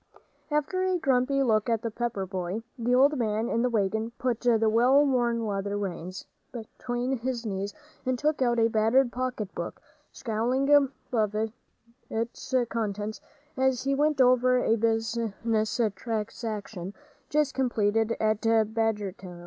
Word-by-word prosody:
After 300 Hz, +5 st, 0 dB
a 370 Hz, -1 st, +1 dB
grumpy 275 Hz, -2 st, +2 dB
look 220 Hz, -2 st, +2 dB
at 230 Hz, 0 st, 0 dB
the 230 Hz, -, -2 dB
Pepper 225 Hz, -4 st, -2 dB
boy, 185 Hz, +3 st, -4 dB
the 245 Hz, 0 st, +1 dB
old 280 Hz, +2 st, +4 dB
man 220 Hz, 0 st, 0 dB
in 230 Hz, -2 st, 0 dB
the 250 Hz, -, +2 dB
wagon 220 Hz, +1 st, 0 dB
put 245 Hz, -3 st, -1 dB
the 225 Hz, -2 st, +3 dB
well 250 Hz, +6 st, +5 dB
worn 240 Hz, -4 st, +1 dB
leather 200 Hz, 0 st, -2 dB
reins 185 Hz, -2 st, -5 dB, 0.3 s
between 245 Hz, +2 st, -4 dB
his 240 Hz, -1 st, -3 dB
knees 200 Hz, -1 st, -3 dB, 0.3 s
and 255 Hz, -1 st, 0 dB
took 295 Hz, +1 st, 0 dB
out 240 Hz, -2 st, +2 dB
a 225 Hz, 0 st, +4 dB
battered 230 Hz, +3 st, +3 dB
pocket 250 Hz, -5 st, -3 dB
book, -, -, -5 dB, 0.3 s
scowling 245 Hz, +4 st, -1 dB
above 255 Hz, -6 st, +2 dB, 0.7 s
its 230 Hz, +3 st, -3 dB
contents 215 Hz, -1 st, -3 dB, 0.3 s
as 265 Hz, -2 st, +1 dB
he 275 Hz, +1 st, +1 dB
went 295 Hz, +1 st, +1 dB
over 255 Hz, 0 st, +5 dB
a 225 Hz, -2 st, +2 dB
business 225 Hz, 0 st, -1 dB, 0.2 s
transaction 210 Hz, -4 st, -4 dB, 0.3 s
just 300 Hz, -2 st, +1 dB
completed 225 Hz, -3 st, +1 dB
at 215 Hz, -1 st, +1 dB
Badgertown. 215 Hz, -5 st, 0 dB
230 Hz, 140 wpm, -27 LUFS, 215-255 Hz, 0.7 s, well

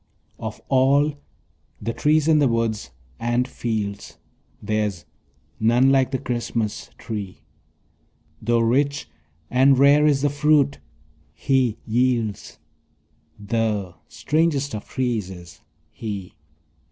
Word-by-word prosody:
Of -, -, -6 dB
all 140 Hz, +3 st, +3 dB, 0.7 s
the 115 Hz, -, -3 dB
trees 155 Hz, +3 st, +2 dB
in 155 Hz, -2 st, +5 dB
the 145 Hz, -, +4 dB
woods 115 Hz, -, -1 dB, 0.3 s
and 120 Hz, +2 st, 0 dB
fields 110 Hz, -5 st, -4 dB, 0.4 s
There's 105 Hz, -4 st, -2 dB, 0.5 s
none 120 Hz, +4 st, +4 dB
like 135 Hz, -1 st, +3 dB
the 135 Hz, -, -1 dB
Christmas 120 Hz, -3 st, -3 dB
tree; 100 Hz, -9 st, -6 dB, 1.0 s
Tho' 115 Hz, +1 st, +2 dB
rich 140 Hz, -, +1 dB, 0.4 s
and 135 Hz, +1 st, +5 dB
rare 145 Hz, +2 st, +5 dB
is 140 Hz, -2 st, +2 dB
the 145 Hz, -, +2 dB
fruit 145 Hz, -1 st, +2 dB, 0.6 s
he 130 Hz, -5 st, +1 dB
yields, 115 Hz, -3 st, -1 dB, 0.8 s
The 105 Hz, -3 st, -1 dB
strangest 150 Hz, -3 st, 0 dB
of 105 Hz, -, -6 dB
trees 120 Hz, -7 st, -1 dB
is 90 Hz, -2 st, -12 dB, 0.3 s
he. 100 Hz, -5 st, -6 dB
120 Hz, 105 wpm, -23 LUFS, 110-140 Hz, 1.0 s, in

